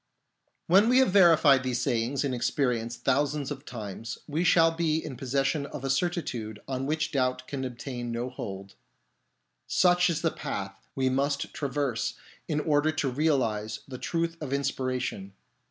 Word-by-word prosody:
When 195 +6 +5
we 250 - +5
have 260 -6 +5
verified 165 -8 +6
these 125 -1 -1
sayings 120 +5 0
in 140 -2 -1
ex 120 - 0
perience 120 -4 -1
thousands 140 +2 0
of 140 0 -6
times, 110 -1 -6
we 155 +4 -1
shall 165 -2 +5
be 165 -1 0
in 155 -4 -5
pos 130 +1 -7
session 140 +2 +1
of 140 - -8
a 135 - 0
certitude 135 - -2
on 135 0 -2
which 155 +1 -1
doubt 130 -2 0
can 135 -2 -4
obtain 120 -1 -5
no 120 +2 -3
hold. 100 -5 -7 0.9
Such 180 0 +4
is 165 -1 -1
the 165 - +2
path 95 0 -4 0.2
we 130 -1 +1
must 140 +2 -1
traverse 140 -4 -2 0.3
in 150 - 0
order 150 0 +2
to 145 -4 -1
realise 115 -7 0
the 130 -2 -7
truth 165 0 -1
of 140 -3 -4
inspiration. 130 -7 -2
135 Hz, 165 wpm, -28 LUFS, 125-155 Hz, 0.9 s, verified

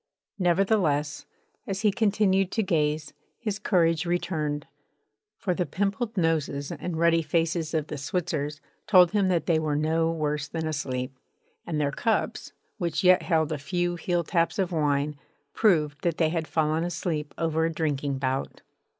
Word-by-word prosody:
Nevertheless, 175 -5 +1 0.4
as 195 0 -2
he 210 -2 +4
continued 195 -3 +2
to 220 - +1
gaze, 155 -4 0 0.2
his 210 -3 -3
courage 165 -6 +2
returned; 155 -4 -1 0.7
for 185 - -1
the 175 -1 -1
pimpled 205 - -2
noses 155 -4 0
and 175 -2 -4
ruddy 165 0 +4
faces 165 +1 0
of 155 -2 0
the 150 - -6
Switzers 150 0 -2 0.3
told 180 -5 +6
him 200 -2 +2
that 175 -4 +1
they 165 -2 +3
were 155 -2 -1
no 160 +2 +1
worse 150 -2 -2
than 160 +1 -4
asleep; 130 -4 -3 0.5
and 160 -3 -1
their 145 -1 +1
cups, 225 - -1 0.3
which 170 +1 -1
yet 185 0 +6
held 160 -3 +1
a 150 - -2
few 175 +3 -1
heeltaps 170 0 0
of 190 -2 0
wine, 145 -2 0 0.3
proved 150 -9 +2
that 170 -2 0
they 160 -2 +3
had 165 -1 -2
fallen 160 0 +1
asleep 160 -3 -3
over 160 -1 +1
a - - -2
drinking 145 -4 -1
bout. 135 0 -3
165 Hz, 155 wpm, -27 LUFS, 150-180 Hz, 0.7 s, told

